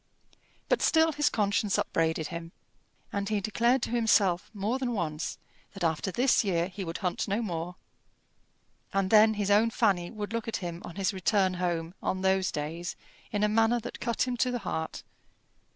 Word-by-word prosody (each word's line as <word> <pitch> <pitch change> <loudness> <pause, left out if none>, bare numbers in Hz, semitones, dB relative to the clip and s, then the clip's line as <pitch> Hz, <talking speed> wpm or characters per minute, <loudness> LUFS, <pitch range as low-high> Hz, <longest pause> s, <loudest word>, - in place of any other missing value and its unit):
But - - +2
still 320 0 +4
his 295 -1 +2
conscience 205 -1 +1
upbraided 160 -1 0
him, 170 0 -7 0.6
and 200 0 -2
he 210 -1 +1
declared 235 +5 +1
to - - -2
himself 210 -6 +3
more 215 +5 -2
than 250 -2 -1
once 160 -6 -3 0.4
that 195 -2 -6
after 165 +3 0
this 245 +4 +3
year 175 -3 0
he 195 +1 -6
would 165 -1 -4
hunt 180 - -1
no 205 +2 0
more. 175 -3 -4 1.2
And 195 -1 0
then 220 0 +6
his 205 -1 0
own 215 +3 +5
Fanny 195 -7 +1
would 215 -1 -6
look 230 -1 -2
at 225 - -1
him 175 -1 -5
on 170 - -9
his 195 0 0
return 190 0 +2
home 175 -2 -2
on 185 - -1
those 190 -1 +2
days 160 +4 -4 0.4
in 205 0 0
a - - +5
manner 225 +2 +3
that 240 - -7
cut 235 -2 0
him 250 - -1
to 250 - +2
the 245 - -1
heart. 160 -2 -3
200 Hz, 185 wpm, -29 LUFS, 175-225 Hz, 1.2 s, then